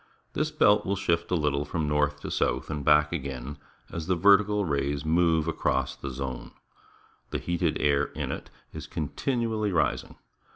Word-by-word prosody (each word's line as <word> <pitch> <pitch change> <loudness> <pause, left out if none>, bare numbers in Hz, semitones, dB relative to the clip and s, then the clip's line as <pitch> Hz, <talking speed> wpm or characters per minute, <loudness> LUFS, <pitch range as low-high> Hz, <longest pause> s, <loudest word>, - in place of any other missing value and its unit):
This - - 0
belt 105 0 +4
will 100 - -1
shift 85 -3 0
a 90 - +1
little 75 -3 0
from 80 0 -2
north 75 0 +1
to - - -5
south - - 0
and 75 -2 -3
back 75 +1 +4
again 70 -2 -5 0.3
as 85 -1 -5
the 95 - +2
ver 100 +3 +7
tical 105 -2 -1
rays 70 0 -1
move 80 0 +2
across 65 -5 0
the 70 - -6
zone. 65 -1 -6 0.8
The - - -2
heated 85 -1 -1
air 70 0 +3
in - - -3
it - - -6 0.2
is - - -7
continually 110 - -1
rising. 85 - 0
80 Hz, 170 wpm, -27 LUFS, 70-90 Hz, 0.8 s, ver